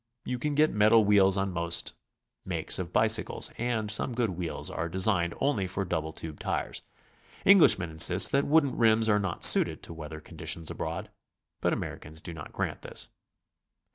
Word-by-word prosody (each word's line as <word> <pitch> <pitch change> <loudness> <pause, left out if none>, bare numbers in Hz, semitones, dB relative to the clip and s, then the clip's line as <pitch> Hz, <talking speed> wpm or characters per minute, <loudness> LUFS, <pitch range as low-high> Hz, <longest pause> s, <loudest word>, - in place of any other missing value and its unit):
You 125 - -4
can 145 +3 -3
get 155 +1 +3
metal 110 +1 +4
wheels 100 -1 +4
on 95 0 -2
most 85 -1 0 0.5
makes - - -1
of 90 -1 -6
bicycles, 110 +2 +2
and'some 115 0 -2
good 115 -4 -1
wheels 85 -1 -4
are 85 - -4
designed 90 -1 +1
only 130 -10 -1
for 95 +1 -4
double 80 -3 -3
tube 80 -1 -9
tires. - - -3 0.6
Englishmen 160 - +5
insist 85 +4 +5
that 140 +1 0
wooden 145 -3 +2
rims 110 -1 +3
are 105 -1 +2
not 95 -4 -4
suited - - +6
to - - -9
weather 80 -1 -9
conditions 80 +1 -4
abroad, - - -6 0.5
but - - 0
Americans 80 +1 -6
do 85 - -7
not 75 -2 -10
grant - - -4
this. - - -8
95 Hz, 165 wpm, -27 LUFS, 85-115 Hz, 0.6 s, suited